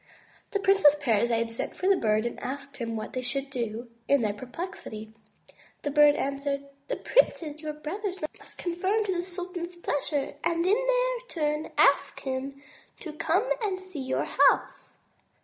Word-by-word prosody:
'* - - -30
The 405 - 0
Princess 390 -7 +6
Parizade 230 -2 +2
sent 230 - -3
for 370 - -1
the 395 - +6
Bird 215 -5 +2
and 235 - -3
asked 280 +1 -5
him 230 -2 -3
what 215 -1 -5
they 255 - -2
should 270 +2 -3
do 235 -2 -3 0.2
in 280 -2 +4
their 210 -1 +1
perplexity. 245 - -7 0.7
The 290 - -1
Bird 295 0 +7
answered: 280 0 -2 0.2
"The - - -1
princes, 310 -14 +2
your 305 -1 -4
brothers, 365 +6 -4 0.2
must - - -11
conform 375 +5 0
to 380 -3 0
the 345 - -1
sultan's 360 -1 -5
pleasure, 290 -4 -2
and 335 0 +1
in 380 - +4
their - - +1
turn 300 -3 -1
ask - - +4
him 270 +1 -4 0.4
to 315 - -6
come 335 +9 +1
and 390 -4 -1
see 370 -6 -7
your 260 0 -1
house." - - +2
300 Hz, 165 wpm, -28 LUFS, 260-370 Hz, 0.7 s, Bird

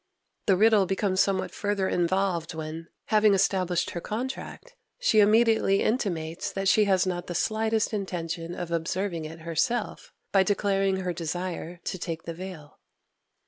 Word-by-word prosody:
The 190 -3 +4
riddle 215 -2 +5
becomes 190 0 0
somewhat 190 -1 0
further 205 -2 -1
involved 175 -2 0
when, 160 +1 -6 0.3
having 210 -1 +5
established 185 -2 +1
her 175 - -5
contract, 260 - -5 0.2
she - - +3
immediately 215 -1 +4
intimates 190 -5 -1
that 195 0 -2
she 210 +2 +5
has 190 -2 +3
not 175 -1 -3
the 175 - -4
slightest 220 +3 0
intention 175 -4 -4
of 175 -1 -5
observing 170 0 -2
it 160 +1 -9
herself, 205 +8 -2 0.2
by 195 - +5
declaring 195 -1 +1
her 180 -1 -2
desire 175 +1 -4
to 185 - -4
take 165 -1 -4
the 165 - -5
veil. 175 -4 -9
190 Hz, 145 wpm, -27 LUFS, 170-205 Hz, 0.3 s, riddle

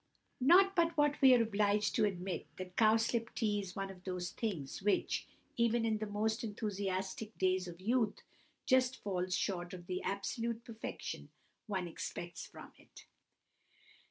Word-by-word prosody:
Not 370 +9 +6
but 335 -1 +2
what 295 0 +3
we 260 -2 +9
are 235 - +4
obliged 210 -1 +2
to - - +3
admit 185 -3 -3
that 185 0 -7
cowslip 225 +1 +3
tea 210 -3 +1
is 185 -2 -8
one 195 -1 -3
of 180 -1 -14
those 180 -1 -3
things 180 - -4
which, 205 +1 +1 0.3
even 235 0 +3
in 220 -1 +1
the 215 - -3
most 215 +2 -1
enthusiastic 205 -1 -3
days 185 -1 +1
of 170 0 -9
youth, 225 +3 0 0.4
just 260 -1 +3
falls 185 -2 -1
short 175 -2 -2
of 175 -1 -10
the 185 0 -3
absolute 225 +4 -2
perfection 225 -1 -6 0.4
one 190 -4 -2
expects 170 +1 -6
from - - -12
it. - - -16
205 Hz, 155 wpm, -35 LUFS, 185-230 Hz, 0.4 s, we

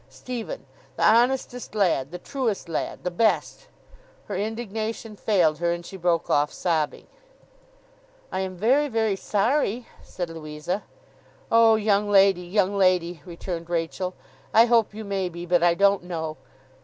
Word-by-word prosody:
Stephen! 245 -3 -6 0.3
The - - +1
honestest 245 0 +2
lad, 170 -10 +1
the 180 - -6
truest 225 -1 -3
lad, 165 - -4
the 180 - -2
best!' 220 +5 0 0.6
Her - - -5
indignation 220 +1 -4
failed 175 -8 +2
her, 170 0 +1
and 170 0 -4
she 195 - -9
broke 175 -2 0
off 145 0 +2
sobbing. 160 -4 -1 1.3
'I - - -2
am 190 -1 -4
very, 260 +9 +3
very 220 -5 0
sorry,' 230 +4 0 0.2
said 175 -2 -6
Louisa. 160 +4 -4 0.7
'Oh, 230 -1 +6
young 210 -1 +1
lady, 195 -2 +5
young 195 +2 0
lady,' 180 -4 +2
returned 170 -1 -6
Rachael, 175 +2 -2 0.4
'I 225 +1 +8
hope 230 -3 +2
you 220 - -6
may 195 -3 -2
be, 170 0 -7
but 175 -1 +2
I 170 0 +4
don't 200 +1 +3
know! 160 -3 -4
195 Hz, 145 wpm, -25 LUFS, 170-220 Hz, 1.3 s, I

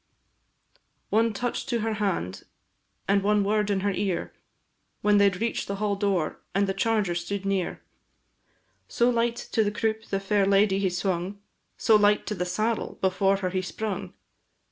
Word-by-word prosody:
One 225 +2 +3
touch 245 +6 -3
to 240 -3 0
her 220 0 -1
hand, 170 - -2 0.6
and 200 0 +3
one 205 +1 +2
word 210 0 +1
in 195 -2 +1
her 200 +1 +1
ear, 195 -2 -2 0.7
When 210 0 +4
they 200 0 +6
reach'd 225 +5 -2
the 200 - -2
hall 205 0 0
door, 195 -5 -1 0.2
and 200 +1 +3
the 195 - -1
charger 205 -2 +1
stood 185 +3 -3
near; 195 -2 -1 1.0
So 240 +1 +2
light 235 0 +1 0.2
to 220 - +3
the 205 - +1
croupe 220 +1 -2
the 195 - -2
fair 195 0 +1
lady 195 0 +4
he 195 -1 +1
swung, 185 +2 -2 0.4
So 220 - +4
light 210 0 +3
to - - -2
the 180 -3 -2
saddle 215 +5 -1
before 195 +1 +2
her 180 - 0
he 185 0 0
sprung! 195 -1 -5
200 Hz, 165 wpm, -26 LUFS, 190-215 Hz, 1.0 s, they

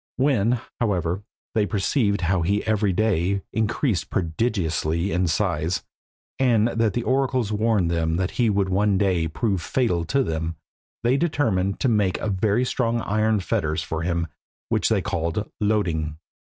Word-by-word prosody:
When, 125 -3 +2 0.2
however, 95 -5 0 0.3
they 105 -2 +2
perceived 100 -1 +1
how 90 +1 +1
he 100 +5 0
every 105 -2 +2
day 100 -1 +1
increased 110 - 0
prodigiously 85 -2 -1
in 90 +1 +1
size, 80 +2 0 0.6
and 120 -4 +3
that 115 -3 +1
the 120 - -1
oracles 130 -4 +1
warned 105 -5 +1
them 80 -1 0
that 90 +1 -1
he 120 -3 +1
would 100 -2 +1
one 100 +1 +2
day 90 -4 +1
prove 95 +3 -1
fatal 90 -4 0
to 135 - +1
them, 80 -3 -3 0.5
they 125 +3 +3
determined 115 - 0
to - - +2
make 105 -6 +2
very 105 +4 +1
strong 120 -2 0
iron 110 0 +1
fetters 80 -2 -1
for 80 0 -3
him 85 0 0 0.4
which - - +1
they - - +1
called 85 +6 -2
Loeding. 85 -8 0
100 Hz, 150 wpm, -24 LUFS, 85-115 Hz, 0.6 s, and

